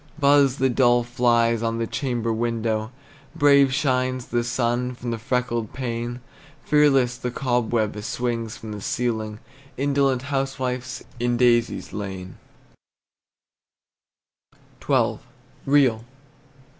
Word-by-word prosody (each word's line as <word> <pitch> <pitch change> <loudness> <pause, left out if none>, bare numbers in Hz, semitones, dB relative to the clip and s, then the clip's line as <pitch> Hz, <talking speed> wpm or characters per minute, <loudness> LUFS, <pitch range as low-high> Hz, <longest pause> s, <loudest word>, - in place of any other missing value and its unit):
Buzz 140 -3 +4
the 130 - +2
dull 120 -1 +3
flies 120 -1 +2
on 115 0 -1
the 115 - -1
chamber 120 -2 -2
window; 115 -1 -1 0.4
Brave 140 -3 +5
shines 130 -2 0
the 120 0 0
sun 120 +1 -1
through 120 0 -5
the 115 - -3
freckled 120 -2 -2
pane; 120 -1 -4 0.4
Fearless 135 -5 +3
the 125 - -3
cobweb 120 -4 0
swings 115 -1 -3
from 110 - -8
the 105 -1 -6
ceiling 110 -2 -2 0.4
Indolent 135 -2 +1
housewife, 130 -1 -2 0.2
in 120 0 0
daisies 120 -1 +2
lain! 95 -3 -6 2.4
XII. - - +1 0.5
REAL. 135 -6 +3
120 Hz, 105 wpm, -23 LUFS, 115-130 Hz, 2.4 s, Brave